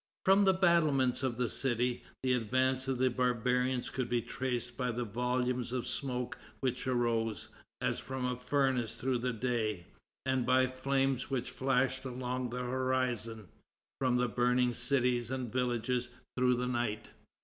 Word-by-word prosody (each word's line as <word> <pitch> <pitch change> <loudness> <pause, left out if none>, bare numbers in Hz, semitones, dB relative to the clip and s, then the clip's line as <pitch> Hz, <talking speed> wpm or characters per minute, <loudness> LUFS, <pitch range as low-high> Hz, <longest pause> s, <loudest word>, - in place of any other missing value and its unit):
From 195 +1 +6
the 190 - +6
battlements 155 -9 +3
of 130 -4 -1
the 125 -1 +1
city, 120 0 0 0.2
the 130 -1 +3
advance 130 +2 +1
of 135 -1 0
the 130 0 +2
barbarians 125 +1 +1
could 125 -2 -2
be 120 - +2
traced 120 0 -3
by 125 0 -1
the 120 +1 -2
volumes 125 +2 -1
of 125 -1 -2
smoke 125 -3 -3 0.2
which 130 -1 -2
arose, 115 -3 0 0.3
as - - 0
from 130 -1 -4
a 125 0 0
furnace, 125 -3 0
through 125 +1 0
the 125 +1 0
day, 110 -6 -1 0.4
and 130 -1 +1
by 130 +1 +4
the 130 - -5
flames 135 -1 0
which 130 -3 -2
flashed 130 0 +1
along 125 -1 -3
the 125 +1 -3
horizon, 125 -5 -1 0.5
from 130 -2 +2
the 125 0 +2
burning 125 +2 +2
cities 120 -1 +1
and 130 -3 -3
villages, 125 -1 0 0.3
through 125 0 +3
the 125 +1 -1
night. 120 -4 -2
125 Hz, 160 wpm, -32 LUFS, 120-130 Hz, 0.5 s, From